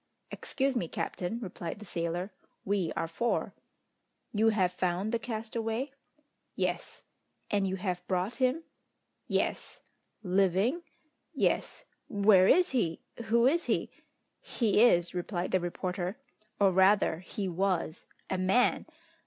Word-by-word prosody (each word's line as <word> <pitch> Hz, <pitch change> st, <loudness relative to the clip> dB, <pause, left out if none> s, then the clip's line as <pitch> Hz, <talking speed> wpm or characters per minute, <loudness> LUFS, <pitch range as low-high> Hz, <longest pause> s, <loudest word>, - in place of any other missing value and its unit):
"Excuse 270 Hz, 0 st, -1 dB
me, 180 Hz, -8 st, -1 dB
captain," 180 Hz, +6 st, -3 dB
replied 180 Hz, -4 st, -5 dB
the 210 Hz, -, -11 dB
sailor, 175 Hz, +2 st, -3 dB, 0.3 s
"we 195 Hz, -4 st, 0 dB
are 165 Hz, -, -1 dB
four." 235 Hz, +9 st, -1 dB, 0.8 s
"You 220 Hz, +1 st, +4 dB
have 190 Hz, -5 st, +2 dB
found 180 Hz, +3 st, -1 dB
the 235 Hz, -, 0 dB
castaway?" 225 Hz, +3 st, -3 dB, 0.6 s
"Yes." -, -, -3 dB, 0.5 s
"And 200 Hz, -2 st, +2 dB
you 190 Hz, -, -1 dB
have 180 Hz, -2 st, -3 dB
brought 185 Hz, +4 st, 0 dB
him?" 265 Hz, +5 st, +1 dB, 0.6 s
"Yes." -, -, -2 dB, 0.4 s
"Living?" 195 Hz, -, +2 dB, 0.5 s
"Yes." -, -, 0 dB, 0.3 s
"Where 200 Hz, -2 st, +5 dB
is 360 Hz, -, +4 dB
he? 175 Hz, -11 st, 0 dB, 0.2 s
Who 235 Hz, +2 st, +3 dB
is 330 Hz, +6 st, +3 dB
he?" -, -, 0 dB, 0.5 s
"He 215 Hz, -3 st, +1 dB
is," 175 Hz, -8 st, +4 dB
replied 180 Hz, 0 st, -3 dB
the 185 Hz, -, +3 dB
reporter, 180 Hz, +2 st, -3 dB, 0.4 s
"or 200 Hz, -2 st, +5 dB
rather 190 Hz, -3 st, +4 dB
he 190 Hz, +2 st, -5 dB
was, 180 Hz, -2 st, -1 dB, 0.2 s
a 190 Hz, -, -2 dB
man! 190 Hz, +7 st, +2 dB
195 Hz, 125 wpm, -30 LUFS, 180-225 Hz, 0.8 s, Where